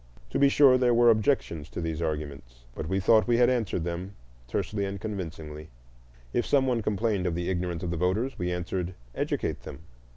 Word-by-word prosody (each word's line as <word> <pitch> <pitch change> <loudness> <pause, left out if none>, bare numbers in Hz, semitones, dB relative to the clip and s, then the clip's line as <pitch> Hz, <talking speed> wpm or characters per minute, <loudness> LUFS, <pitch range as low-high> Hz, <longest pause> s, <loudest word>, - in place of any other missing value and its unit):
To - - 0
be 140 - +6
sure, 135 -2 +6
there 125 -2 +3
were 120 0 +6
objections 105 - 0
to - - -6
these 80 -1 -3
arguments, 70 -7 -5
but 75 - -5
we 95 +1 +1
thought 110 +4 +4
we 120 -1 +3
had 120 +1 +5
answered 110 -8 -1
them 90 +3 -5 0.3
tersely 100 - -2
and 100 0 -3
convincingly; 80 -7 -6 0.6
if 120 - +2
some 135 -2 +2
one 125 -3 +1
complained 105 -2 0
of 85 - -1
the 85 +2 -1
ignorance 90 -2 -2
of 85 - -2
voters, 95 +10 -1
we 90 0 -1
answered, 90 0 -3 0.2
"Educate - - -2
them." 70 - -9
95 Hz, 190 wpm, -27 LUFS, 85-115 Hz, 0.6 s, be